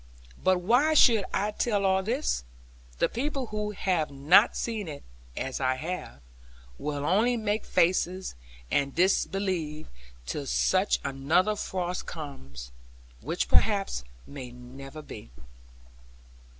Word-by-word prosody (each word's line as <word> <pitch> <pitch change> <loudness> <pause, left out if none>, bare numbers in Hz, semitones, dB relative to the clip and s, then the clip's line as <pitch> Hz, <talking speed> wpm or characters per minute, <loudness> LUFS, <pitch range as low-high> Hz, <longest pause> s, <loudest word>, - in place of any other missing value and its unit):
But 185 -1 +3
why 250 - +3
should 230 -8 +6
I 205 +2 0
tell 210 -2 0
all 190 0 +3
this? 235 - -1 0.5
the - - +3
people 275 +2 -2
who 210 0 -1
have 185 -6 0
not 145 +10 +5
seen 220 -5 -3
it 145 -2 -7 0.3
(as 130 -1 -3
I 130 0 +2
have) 160 - -5 0.6
will 145 -1 -3
only 225 +8 +3
make 215 -1 -1
faces, 185 +2 +1 0.4
and 140 -1 +1
disbelieve; 180 -4 0 0.4
till 140 - -4
such 190 +7 +2
another 155 +10 +1
frost 180 -3 -3
comes; 70 - -8 0.5
which - - -2
perhaps 60 +1 +2 0.2
may 135 -3 -8
never 135 +4 -10
be. 105 - -10
180 Hz, 120 wpm, -28 LUFS, 140-210 Hz, 0.6 s, should